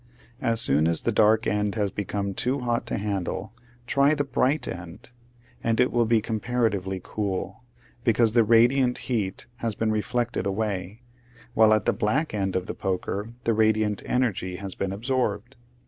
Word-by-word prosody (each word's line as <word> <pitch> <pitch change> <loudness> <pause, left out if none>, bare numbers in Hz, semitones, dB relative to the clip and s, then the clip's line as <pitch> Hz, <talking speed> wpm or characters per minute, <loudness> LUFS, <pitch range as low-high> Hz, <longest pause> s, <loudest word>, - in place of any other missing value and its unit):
As 115 -4 +2
soon 75 -6 +4
as 85 -1 0
the 115 - +1
dark 110 +1 +4
end 105 0 0
has 105 -3 0
become 100 0 -3
too 130 +7 -1
hot 120 -1 -1
to - - -2
handle 100 +1 -3 0.3
try 140 +4 +3
the 145 - 0
bright 135 +2 0
end, 90 +7 -8 0.5
and 115 0 +1
it 125 - +3
will 120 -1 +2
be 115 -1 +3
comparatively 110 -4 -1
cool, 100 +3 -4 0.4
because 115 -1 +3
the 115 0 +4
radiant 120 +3 +4
heat 105 -7 -2
has 115 -3 -2
been 110 +1 0
reflected 115 -1 -1
away, 100 +1 -3 0.5
while 110 -2 +5
at 110 -1 +3
the - - +2
black 135 +9 0
end 95 -2 -1
of 90 -1 -1
the - - -4
poker 100 +4 -3
the 115 - +2
radiant 110 -1 +2
energy 105 -8 0
has 95 0 -4
been 95 -1 -3
absorbed. 120 +1 -2
110 Hz, 165 wpm, -25 LUFS, 100-120 Hz, 0.5 s, while